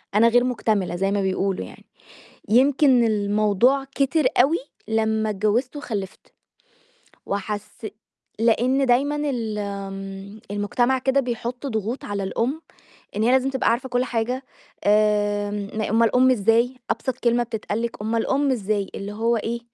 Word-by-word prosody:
أنا 230 +2 +6
غير 245 +1 +4
مكتملة 215 -7 0
زي 195 +2 0
ما 200 0 +1
بيقولوا 190 - -1
يعني. - - -14 0.6
يمكن 260 +2 +4
الموضوع 215 +5 +2
كتر 280 +2 +1 0.2
أوي 295 +7 +4 0.3
لمّا 220 0 +1
اتجوزت 215 +7 0
وخلِفت، 210 -9 -6 0.9
وحسي 205 +1 -5 0.5
لأن 245 +4 +2
دايمًا 275 +4 +2
ال 225 -5 -3
آمم 195 0 -6
المجتمع 240 +6 +1
كده 265 +2 +2
بيحط 245 +1 -4
ضغوط 225 0 -3
على 200 -1 -3
الأم، 245 +10 -2 0.5
إن 210 - 0
هي 230 - +3
لازم 260 +1 +3
تبقى 265 -1 +1
عارفة 250 +3 -1
كُلّ 245 0 +1
حاجة 250 +2 -2 0.4
آمم 205 -1 +1
م - - 0
أومال 230 0 +3
أُم 260 +1 +5
إزاي؟! 230 +2 +2 0.2
أبسط 260 -2 -2
كلمة 240 0 +2
بتتقال 220 -1 -4
لِك: 235 -2 -4
"أومال 225 +1 -1
أُم 275 +1 +2
إزاي؟!" 210 -4 -1
اللي 200 +1 -5
هو 230 +3 +1
إيه، 235 +2 -3
225 Hz, 145 wpm, -23 LUFS, 205-250 Hz, 0.9 s, أنا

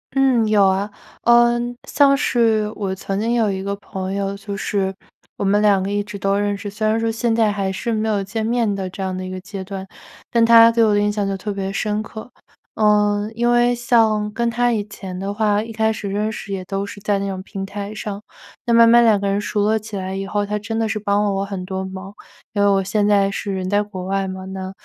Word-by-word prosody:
嗯， 255 -5 +3
有 205 -2 +4
啊， 195 +2 +1 0.3
呃， 240 0 +5 0.3
像 280 -1 +4
是 225 -5 +1
我 195 -2 -2
曾 195 +1 -3
经 230 +2 0
有 225 -4 +2
一 190 0 -3
个 200 +1 -3
朋 190 -1 -6
友， 200 0 -2
就 200 -1 -6
是 195 -1 -1 0.4
我 - - -4
们 205 +1 +3
2 200 -3 +4
个 200 - -3
一 205 0 0
直 205 0 -7
都 195 +1 0
认 205 0 0
识， 205 - -6
虽 215 +2 -2
然 220 +1 +2
说 225 0 0
现 225 0 0
在 220 -2 +3
还 195 -1 -2
是 230 +4 -3
没 220 0 0
有 205 -2 0
见 220 +3 -3
面 230 -3 +1
的 190 -2 -4
这 190 +1 -6
样 185 -1 -2
的 185 - -5
一 185 - -6
个 185 - -5
阶 195 -1 -7
段， 195 0 -6 0.5
但 230 -1 +4
他 230 0 +8
对 230 -1 +3
我 210 - +3
的 205 - +3
印 210 0 +1
象 205 -1 -1
就 195 - -1
特 205 +2 -4
别 195 0 -3
深 210 +1 -1
刻。 220 +3 -9 0.4
呃， 210 -1 +2
因 240 +1 +1
为 240 0 +4
像 225 -3 +2
跟 235 0 0
他 240 0 +1
以 210 -3 -1
前 190 -3 -8
的 200 +1 -3
话， 210 0 +1
一 225 - -8
开 220 0 +1
始 210 -2 -5
认 210 +2 -1
识 200 -2 -6
也 185 -1 -4
都 195 +1 -3
是 200 0 -9
在 205 -1 +1
那 200 0 -2
种 190 -1 -4
平 195 0 -6
台 200 +2 -6
上， 205 -1 -5 0.5
那 235 - +3
慢 230 0 +7
慢 235 +1 +6
2 220 -3 +4
个 200 - -2
人 200 +1 0
熟 205 0 -1
络 220 +1 +2
起 215 -1 -9
来 190 0 -4
以 195 0 -4
后， 205 0 -1
他 210 +1 -2
真 225 +2 -4
的 225 -1 +1
是 215 0 -2
帮 205 0 +1
了 205 - +1
我 195 0 -1
很 195 -2 -5
多 190 0 -4
忙。 190 +1 -8 0.4
因 205 - 0
为 200 - +4
我 195 -1 +2
现 205 +2 +1
在 200 -1 +3
是 200 0 -4
人 185 -1 -3
在 205 +1 +2
国 190 -3 -6
外 195 0 -1
嘛， 190 0 -6
那 190 0 -6
205 Hz, 270 characters per minute, -20 LUFS, 195-220 Hz, 0.5 s, 他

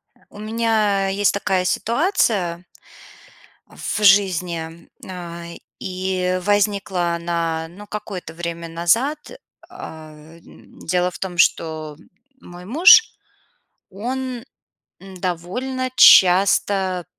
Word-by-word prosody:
Э, - - -30
у 205 - -14
меня 215 -3 0
есть 200 +1 +1
такая 190 -2 -1
ситуация 210 - 0 1.0
в 215 - -5
жизни, 175 -4 +1
на 170 -2 -8 0.3
и 185 -1 -2
возникла 200 -3 0
она, 170 -1 -3
ну, 200 +5 -13
какое-то 195 -6 -7
время 170 0 -6
назад. 200 - 0 0.5
А, 155 -1 -10 0.2
э, - - -19
дело 180 +1 -4
в - - -11
том, 180 -2 -6
что 155 -3 0 0.4
мой 175 -4 -12
муж- 365 - +6 0.8
он 250 +4 -5 0.6
довольно 195 +8 -4
часто 190 -1 +5
185 Hz, 95 wpm, -20 LUFS, 170-210 Hz, 1.0 s, муж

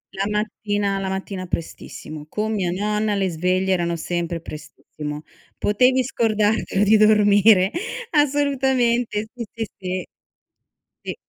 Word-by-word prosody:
La 195 - -1
mattina 205 -1 -1
la 190 -1 -3
mattina 190 -1 -4
prestissimo. 155 -2 -6
Con 215 +1 -2
mia 190 -4 0
nonna 210 +2 0
le 195 -2 0
sveglie 185 +3 0
erano 170 -1 0
sempre 170 0 -3
prestissimo. 150 0 -8 0.3
Potevi 255 +5 +3
scordartelo 215 -4 +1
di 215 +2 +5
dormire. 210 -2 +5 0.4
Assolutamente, 265 -6 +1
si, 240 -2 -5
si, 225 -1 -3
si. 185 -1 -4 1.0
Sì. - - -5
205 Hz, 115 wpm, -22 LUFS, 180-220 Hz, 1.0 s, di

